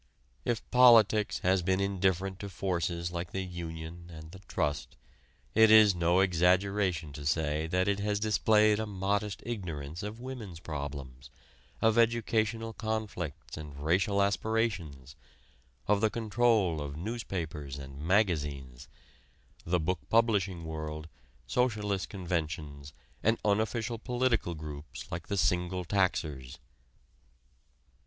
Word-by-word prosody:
If 120 -2 -1
"politics" 115 -4 +6
has 95 0 +3
been 95 +2 +1
indifferent 95 -1 0
to 100 - -6
forces 85 -2 -2
like 85 0 -4
the 95 - -2
union 85 -1 -7
and 80 -1 -10
the 95 - -11
trust, 75 0 -2 0.6
it 110 0 +6
is 110 -2 +8
no 85 +1 +3
exaggeration 90 -2 +2
to 70 +1 -7
say 75 +1 0
that 90 +3 +1
it 100 0 +1
has 105 0 0
displayed 110 0 +3
a 110 - -2
modest 100 +1 -2
ignorance 85 -8 -5
of 105 +2 -6
women's 120 -9 -7
problems, 70 -4 -6 0.5
of 110 +1 +4
educational 115 -1 +1
conflicts 105 -9 -4
and 75 -2 -8
racial 100 +6 +2
aspirations; 100 - -1 0.7
of 105 0 +3
the 110 - +4
control 110 -7 +1
of 70 0 -5
newspapers 80 - -4
and 70 0 -9
magazines, 75 - 0 0.8
the 90 +1 +1
book 90 +4 -1
publishing 100 -7 +2
world, 80 0 -5 0.4
socialist 105 -6 0
conventions 80 -6 -4 0.3
and 115 +1 +2
unofficial 110 +2 0
political 120 -8 0
groups 75 -1 -8
like 85 0 -5
the 100 - -2
single 90 0 +1
taxers. 80 -9 -1
95 Hz, 120 wpm, -30 LUFS, 80-105 Hz, 0.8 s, is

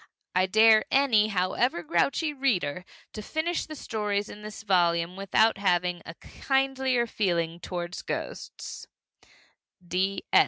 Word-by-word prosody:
I 185 +1 +2
dare 220 +2 +6
any, 245 -6 +4
however 185 +1 0
grouchy, 275 - 0
reader 185 - -1 0.3
to 215 - -6
finish 315 +9 -2
the 310 - -7
stories 210 -5 -2
in 210 - -10
this 215 +1 -9
volume 175 -3 +2
without 195 +3 +2
having 180 -2 +1
a 165 - -8
kindlier 265 -1 0
feeling 170 -7 -1
toward 175 0 -5
ghosts! - - -6
205 Hz, 115 wpm, -27 LUFS, 180-245 Hz, 0.3 s, dare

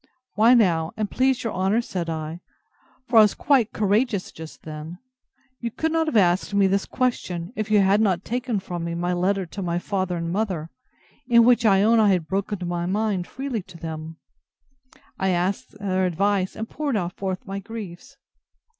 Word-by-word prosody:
Why, 230 +4 +5
now, 170 -8 +2
and 215 -2 -2
please 260 -1 +1
your 230 - -2
honour, 190 +4 +1
said 180 -7 -3
I, 160 +1 -4 0.7
(for 230 -2 +6
I - - +10
was 210 -1 +4
quite 260 -6 +2
courageous 210 0 0
just 160 0 -11
then,) 155 +2 -8 0.6
you 235 - -3
could 315 +8 -2
not 325 0 +1
have 260 - +1
asked 185 +1 +2
me 200 -1 +4
this 195 +1 +1
question, 185 -7 -2
if 215 0 -3
you 210 -1 +5
had 195 +2 +3
not 190 -4 +1
taken 245 -2 -2
from 175 -2 -5
me 170 0 -3
my 175 +1 -1
letter 190 +2 0
to 195 +4 -7
my 175 -2 -1
father 185 -1 -2
and 165 0 -3
mother, 185 -5 -2 0.6
in 235 -2 +6
which 235 -1 +4
I 195 -1 +5
own 225 +2 +4
I 215 -2 +5
had 180 -4 +2
broken 195 -1 -2
my 175 0 -2
mind 200 -2 -1
freely 265 -4 -4
to 185 -1 -14
them, 160 0 -7 1.0
and 190 0 +1
asked 185 +4 -2
their 190 -2 0
advice, 190 +2 0
and 220 - -5
poured 285 -4 -2 0.2
forth 190 +4 -4
my 195 -1 -4
griefs! 200 -4 -9
195 Hz, 185 wpm, -24 LUFS, 175-220 Hz, 1.0 s, I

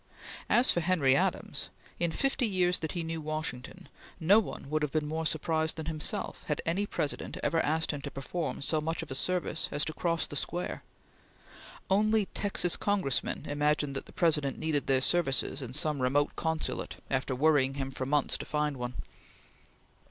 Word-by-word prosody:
As 245 +2 +5
for - - +1
Henry 160 -6 +3
Adams, - - 0 0.3
in 170 - +2
fifty 265 - 0
years 180 -3 +2
that 160 - -3
he 175 - -2
knew 165 0 -3
Washington, 155 +2 -4 0.3
no 190 +6 +6
one 200 - -5
would 155 +2 0
have 150 -2 0
been 155 -1 0
more 160 +1 -1
surprised 160 -1 0
than 160 - -5
himself 155 -1 -3
had 150 - 0
any 190 +5 0
President 150 - -3
ever 165 +3 +2
asked 160 +2 +1
him 145 -2 -5
to 140 - -4
perform 140 +3 -4
so 155 +2 +1
much 165 +2 -2
of 150 - -10
a - - -1
service 175 +2 -1
as 145 0 0
to 155 - -3
cross 165 +1 0
the - - -7
square. 175 +5 -2 1.1
Only 215 +2 +3
Texan 190 -3 0
Congressmen 190 -12 0
imagined 145 -1 +1
that 135 - -4
the - - -12
President 150 -5 +2
needed 155 -3 -1
their 130 -1 +3
services 140 -3 +1
in 125 -3 -6
some 150 -1 0
remote 140 +3 +2
consulate 160 -1 -2 0.2
after 130 0 0
worrying 140 -1 +3
him 135 -1 -3
for 130 -1 -4
months 145 0 +2
to - - -5
find 150 -2 0
one. 125 0 -4
155 Hz, 180 wpm, -30 LUFS, 140-170 Hz, 1.1 s, no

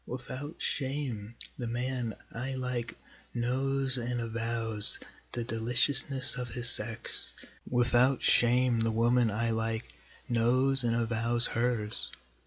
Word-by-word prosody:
Without 130 +4 -6
shame 130 -6 -2 0.2
the 120 - -2
man 120 -1 -2 0.2
I 130 +3 -4
like 125 -2 -3 0.4
knows 130 +2 +1
and 120 0 -2
avows 115 -2 -1 0.3
the 120 - -2
deliciousness 125 +4 0
of 125 -1 -4
his 120 0 -1
sex, 115 -1 -2 0.3
Without 125 +1 +3
shame 120 0 +5
the 115 0 +2
woman 120 +1 +3
I 115 +2 0
like 115 0 -2 0.3
knows 130 +3 +4
and 115 -1 +1
avows 115 +1 +3
hers. 115 -3 -1
120 Hz, 115 wpm, -30 LUFS, 115-130 Hz, 0.4 s, shame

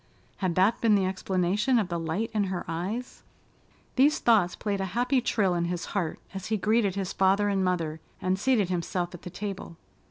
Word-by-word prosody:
Had 185 -4 -1
that 190 +5 +3
been 225 -2 +5
the 195 -2 +2
explanation 190 +5 +1
of 205 -5 0
the 170 -1 -2
light 175 +8 -2
in 210 -2 +1
her 185 -2 -3
eyes? 190 +10 -4 0.8
These 285 +4 +5
thoughts 205 -7 +3
played 200 -2 -2
a - - 0
happy 250 +2 +2
trill 200 -6 +1
in 170 -1 0
his 175 0 -3
heart 180 -6 -1 0.2
as 190 -2 -5
he 220 - 0
greeted 210 -1 +2
his 195 -2 -3
father 195 +2 +3
and 195 -1 +1
mother 165 -4 -1 0.2
and 185 +1 0
seated 220 -5 +2
himself 175 0 -2
at 175 - -9
the - - -7
table. 195 -3 -6
190 Hz, 195 wpm, -27 LUFS, 180-210 Hz, 0.8 s, been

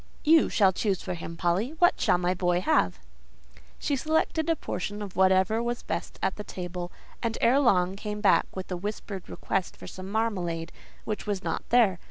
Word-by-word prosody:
"You 320 +1 +5
shall 195 -3 +4
choose 195 -1 -1
for 185 - -3
him, 165 -1 -7
Polly; 190 - 0
what 350 +1 +3
shall - - +4
my 180 0 +1
boy 175 -1 +1
have?" 90 - +2 0.8
She 285 - -1
selected 315 +2 0
a 330 - +3
portion 205 - -4
of 200 -3 -7
whatever 190 +4 +3
was 240 0 -3
best - - -4
on 190 - +3
the 210 - -5
table; 180 -2 -6 0.3
and, 230 -2 -1
ere 250 +4 +4
long, 190 -8 +3
came 210 +1 -5
back 210 - +4
with 190 0 -6
a 180 - -1
whispered 200 0 -6
request 190 -2 -2
for - - -11
some 185 0 -8
marmalade, 180 -7 -1 0.3
which 210 -1 -4
was 200 -2 -2
not - - -3
there. 220 -7 +4
195 Hz, 190 wpm, -27 LUFS, 180-230 Hz, 0.8 s, You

